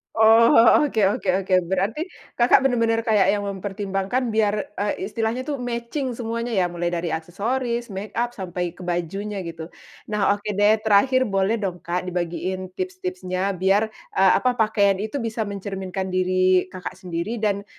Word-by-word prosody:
Oh 225 +1 +6
oh, 235 +6 +6
oke 225 -6 0
oke 205 - -3 0.2
oke, 185 0 +1
berarti, 195 - -1 0.3
Kakak 240 +2 +5
benar-benar 230 -3 +2
kayak 210 -4 +3
yang 205 - -1
mempertimbangkan, 195 +4 -2
biar, 215 -1 +2 0.2
e 200 0 -2
istilahnya 225 +3 -1
tuh, 280 +1 -3
matching 245 +2 -3
semuanya, 230 0 -3
ya? 180 -3 +2
Mulai 175 0 -3
dari 170 0 -2
aksesoris, 235 +9 -2
make-up, 210 +5 -3
sampai 180 -2 -4
ke 180 - -9
bajunya, 190 +4 -3
gitu. 165 -1 -8 0.3
Nah, 205 -1 +1
oke 205 - -23
deh, 205 +2 +4
terakhir 255 +5 +4
boleh 195 +2 +1
dong 185 -4 -4
Kak, 180 +2 -3
dibagiin 180 +1 -3
tips-tipsnya, 185 +1 -3
biar, 200 +4 +2 0.2
e - - +1 0.2
apa, 250 +5 +1
pakaian 205 -4 +2
itu 220 +6 -3
bisa 230 -2 -3
mencerminkan 190 -1 -5
diri 185 0 +2
Kakak 185 -1 -7
sendiri 185 +5 -4
dan, 200 -1 0
200 Hz, 155 wpm, -23 LUFS, 185-225 Hz, 0.3 s, Oh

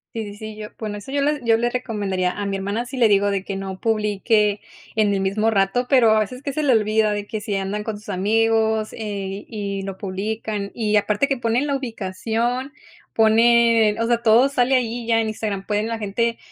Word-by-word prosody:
Sí 225 - -2
sí 205 -1 -8
sí 215 0 -8
yo 210 0 -8
bueno, 215 -2 -4
eso 205 +6 -9
yo 285 - 0
le 295 -1 0
yo 225 -1 +4
le 240 +1 0
recomendaría, 205 -7 -2
a 205 - -5
mi 200 0 -2
hermana 200 +5 -2
sí 255 +2 -8
le 235 -4 +4
digo 200 0 +3
de 195 -1 -1
que 195 0 -5
no 190 -1 -6
publique 210 -1 +1 0.3
en 215 -2 +2
el 195 - 0
mismo 205 +4 +1
rato, 205 +5 +1
pero 250 -5 +5
a 215 - +4
veces 250 +5 -5
que 280 -1 -4
se 310 - -1
le 280 - +3
olvida 215 -1 +2
de 205 0 -3
que 215 -1 -4
si 210 -1 -4
andan 195 +2 -3
con 215 -1 -4
sus 210 - -18
amigos, 220 +2 +1
eh, 200 -2 -5
y 200 -3 -4
lo 195 -1 -6
publican, 205 +1 -4
y 215 -2 0
aparte 210 +5 +2
que 275 - 0
ponen 240 +3 0
la 280 - 0
ubicación 235 +2 -2 0.4
ponen 225 -1 +4
o 230 - 0
sea, 235 0 +1
todo 235 +4 +5
sale 265 -1 +2
ahí 240 -1 -1
ya 225 0 +2
en 225 - 0
Instagram, 205 -3 -4
pueden 210 +1 -1
la 230 - -2
gente, 230 +3 -1
220 Hz, 220 wpm, -22 LUFS, 205-235 Hz, 0.4 s, pero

